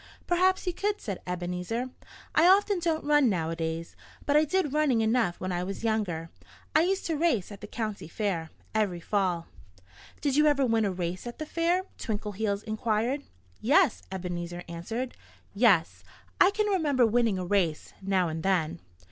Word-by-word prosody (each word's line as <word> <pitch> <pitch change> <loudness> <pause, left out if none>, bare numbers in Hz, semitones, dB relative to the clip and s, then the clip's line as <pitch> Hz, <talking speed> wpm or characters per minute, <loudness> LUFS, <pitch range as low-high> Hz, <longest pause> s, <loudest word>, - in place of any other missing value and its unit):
"Perhaps 370 +2 +2
you 360 - -1
could," 410 +3 -1
said 195 -4 -5
Ebenezer. 180 +7 -3 0.4
"I - - +4
don't 385 +2 +5
often 315 -2 0
run 295 -4 +5
nowadays. 165 -2 -2 0.3
But 285 - +2
I 305 +1 +6
did 310 -2 0
running 295 -7 +3
enough 220 -5 +1
when 185 0 -3
I 175 0 -1
was 195 +4 -5
younger. 190 -8 -1 0.4
I 310 - +7
used 380 +3 0
to 325 - 0
race 290 - +1
at 200 - -10
the 210 - -7
county 215 -5 -4
fair, 170 -3 -2 0.2
every 205 -5 0
fall." 180 -3 0 0.7
"Did 280 -3 0
you 300 +1 +5
ever 280 -2 +3
win 225 -2 +2
a 200 - 0
race 180 +3 -4
at 240 - -7
the 310 - -4
fair?" 340 +4 +1 0.2
Twinkleheels 210 -1 -2
inquired. 225 +4 -1 0.4
"Yes!" 290 - +3
Ebenezer 175 -1 -4
answered. 225 +10 -4 0.4
"Yes! 200 -6 +3 0.4
I 370 - +7
can 425 +1 0
remember 305 - +3
winning 225 -3 +2
a 185 - -3
race 175 -5 0
now 190 -2 +1
and 160 0 -4
then." 165 - 0
220 Hz, 165 wpm, -28 LUFS, 180-295 Hz, 0.7 s, I